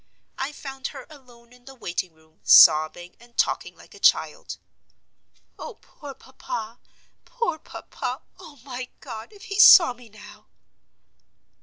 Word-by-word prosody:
I 270 +2 -3
found 270 -2 -8
her - - -11
alone 245 -4 -19
in 250 0 -22
the 270 - -13
waiting 180 -6 -5
room, 160 0 -29
sobbing, 155 +3 +5
and 240 0 -22
talking - - -1
like - - -19
a - - -15
child. - - 0 1.0
"Oh, 470 - -9
poor 285 -8 -13
papa! 245 -5 -8 0.4
poor 465 -11 -4
papa! - - -8 0.2
Oh, 300 - -14
my 255 -2 -7
God, 225 - -10
if 410 -2 -17
he 395 +1 -6
saw 340 -8 +8
me 245 -1 -18
now!" 210 0 -16
250 Hz, 140 wpm, -23 LUFS, 220-290 Hz, 1.0 s, saw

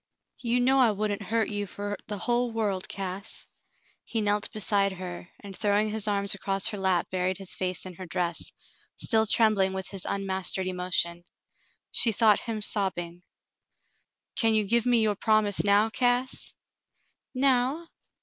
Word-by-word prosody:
"You 240 0 0
know 265 +2 +3
I 250 -3 +5
wouldn't 210 0 -2
hurt 220 +2 -1
you 205 -1 -3
fer 205 +2 -5
the 210 - -4
hull 240 +4 +1
world, 205 -4 -2
Cass." 195 +1 -5 0.6
He 230 - -3
knelt 205 -1 0
beside 200 -2 +1
her, 180 -1 -8
and 200 -1 -9
throwing 210 +1 +1
his 220 0 -1
arms 200 -1 +1
across 195 0 +1
her 210 - -5
lap 190 -2 0
buried 185 0 -1
his 195 -2 -5
face 185 -1 -2
in 185 - -8
her 185 +1 -9
dress, 170 0 -1 0.4
still 220 -2 +1
trembling 205 -4 +3
with 190 -1 -5
his 195 -2 -5
unmastered 190 -1 -1
emotion. 180 -2 -1 0.7
She 230 - +5
thought 215 0 +4
him 220 -3 -4
sobbing. 175 -5 -1 1.1
"Can 225 -3 +2
you 215 - +3
give 235 +3 +2
me 240 -2 +4
your 215 -1 +2
promise 215 -1 +2
now, 205 +2 +3
Cass 245 +2 0 0.4
?'* - - -47
"Now 265 +4 +2
205 Hz, 160 wpm, -27 LUFS, 190-225 Hz, 1.1 s, I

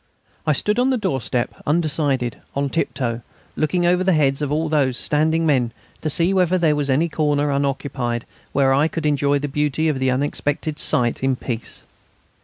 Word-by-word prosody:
I 155 - +4
stood 210 - 0
on 255 +2 +3
the 260 - +2
doorstep, 130 - -1
undecided, 145 -6 0 0.2
on 140 0 -1
tip 165 - 0
toe, 120 -3 -2 0.3
looking 175 +3 +1
over 180 +1 +3
the 190 0 +3
heads 140 -3 +2
of 145 -1 -1
all 155 +2 0
those 140 -5 +1
standing 160 +2 +1
men 130 -6 +2 0.3
to 155 - -1
see 170 +5 +2
whether 185 -1 +3
there 160 -4 +3
was 145 -1 -1
any 145 +6 +3
corner 150 -2 0
unoccupied 135 -4 -2 0.3
where 135 -1 +3
I 145 +4 +3
could 160 -1 -4
enjoy 145 -1 +2
the 145 +1 -3
beauty 150 +2 0
of 140 -4 -1
the 130 0 +1
unexpected 145 +3 -1
sight 125 -6 +1
in 135 0 +1
peace. 120 -2 -6
145 Hz, 185 wpm, -21 LUFS, 135-160 Hz, 0.3 s, I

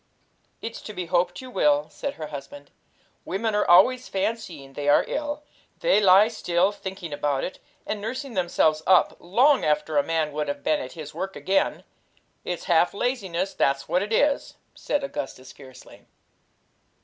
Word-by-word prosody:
'It's 230 - -6
to 215 - -8
be 180 -3 -4
hoped 175 +2 0
you 255 -1 -10
will,' 150 -6 +2
said 280 - -5
her 155 - -6
husband. 140 0 -9 0.5
'Women 215 +4 -2
are 210 - +1
always 250 +9 +5
fancying 190 -9 -3
they 145 +1 -2
are 145 - +5
ill. 295 0 -3 0.4
They - - +4
lie 195 +2 +7
still 185 -4 +1
thinking 190 -5 -7
about 145 -2 -1
it, 185 - -5 0.3
and 210 -1 -3
nursing 255 +4 -5
themselves 170 -5 +2
up, 185 -2 +5
long 255 +11 +3
after 150 0 +1
a - - +2
man 160 -2 -1
would 150 +1 -3
have 145 0 -4
been 155 -1 +2
at 130 - -7
his 155 -2 -9
work 190 +4 -5
again. 195 +1 0 0.6
It's 180 - -4
half 175 +2 +2
laziness, 195 -6 -2
that's 140 0 0
what 180 - +1
it 205 +2 -4
is!' 280 +5 +1 0.2
said 290 - -2
Augustus 130 - -6
fiercely. 130 -2 -15
180 Hz, 165 wpm, -25 LUFS, 150-215 Hz, 0.6 s, lie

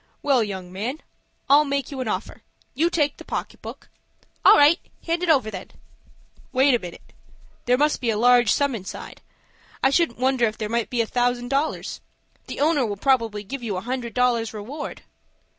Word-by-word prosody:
"Well, 270 -5 +3
young 190 -4 -6
man, 240 +11 -4 0.5
I'll 290 +2 +6
make 280 -2 -2
you 270 -2 -4
an 255 - -3
offer. 200 -1 -4 0.3
You 325 +6 +2
take 295 -4 0
the - - -10
pocket - - -5
book—" - - -9 0.6
"All - - +8
right. 295 +4 +6 0.3
Hand 335 +1 -1
it 360 - -1
over, 260 -9 +3
then." 190 -3 -8 0.8
"Wait 265 +1 +4
a 240 - +3
minute. 175 -4 -11 0.5
There 250 +1 +4
must 295 0 +1
be 240 - 0
a 215 - +1
large 245 -1 +5
sum 280 -2 +1
inside. 195 -5 -8 0.6
I 265 - +4
shouldn't 330 -5 +1
wonder 255 -1 +2
if 215 - -5
there 215 -1 -4
might 235 0 -1
be 240 -2 0
a - - 0
thousand 245 +1 0
dollars. 280 +3 -2 0.5
The - - -6
owner 300 -2 +3
will 205 -4 -3
probably 230 -4 +1
give 265 +6 -6
you 210 -5 -3
a - - -3
hundred 245 +1 -4
dollars 235 -3 +1
reward." 260 +9 -7
245 Hz, 190 wpm, -23 LUFS, 220-280 Hz, 0.8 s, All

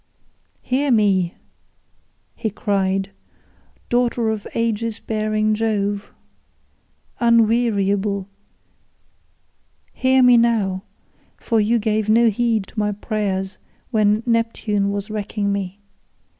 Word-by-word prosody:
"Hear 275 +3 0
me," 195 -7 +2 1.0
he 220 - -3
cried, 195 -1 -1 0.8
"daughter 240 -2 +1
of 215 -2 -5
Aegis 230 -1 -1
bearing 215 0 0
Jove, 205 -2 -1 1.1
unweariable, 215 -4 +2 1.7
hear 260 0 +3
me 245 -1 +7
now, 215 -5 +1 0.6
for 225 - 0
you 225 +3 +2
gave 215 -1 0
no 230 +1 +5
heed 225 -1 0
to 215 - -7
my 210 0 0
prayers 200 -2 -3 0.3
when 215 -1 +2
Neptune 230 -3 0
was 200 +1 -4
wrecking 205 -1 -2
me. 200 -1 -4
215 Hz, 95 wpm, -21 LUFS, 200-230 Hz, 1.7 s, me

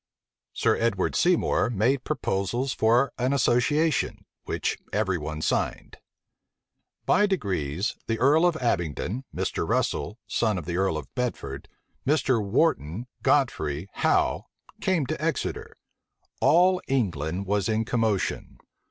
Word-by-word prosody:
Sir - - +2
Edward 110 -5 0
Seymour 175 -7 +2
made 120 +5 +1
proposals 120 +8 -1
for 120 +5 +3
an 130 +3 +1
association, 140 +4 +1 0.2
which - - -2
every 95 -4 0
one 75 +1 -5
signed. - - -1 1.1
By 210 - +4
degrees, 95 - -1
the 115 - 0
earl 145 +8 +4
of 175 - +1
Abingdon, 110 - -2
Mr. - - -2
Russel, 105 - 0
son 110 -4 0
of 90 - -5
the 85 0 -3
earl 95 -4 +1
of 75 -4 -8
Bedford, 70 - -4 0.3
Mr. 135 -6 +2
Wharton, 100 - 0 0.2
Godfrey, 90 - +1
Howe, - - +1 0.3
came 180 -7 +1
to 155 +3 -4
Exeter. 165 -4 -2 0.6
All 180 +3 +4
England 95 - -1
was 100 0 0
in 110 0 +1
commotion. 110 -4 -1
115 Hz, 120 wpm, -26 LUFS, 95-135 Hz, 1.1 s, By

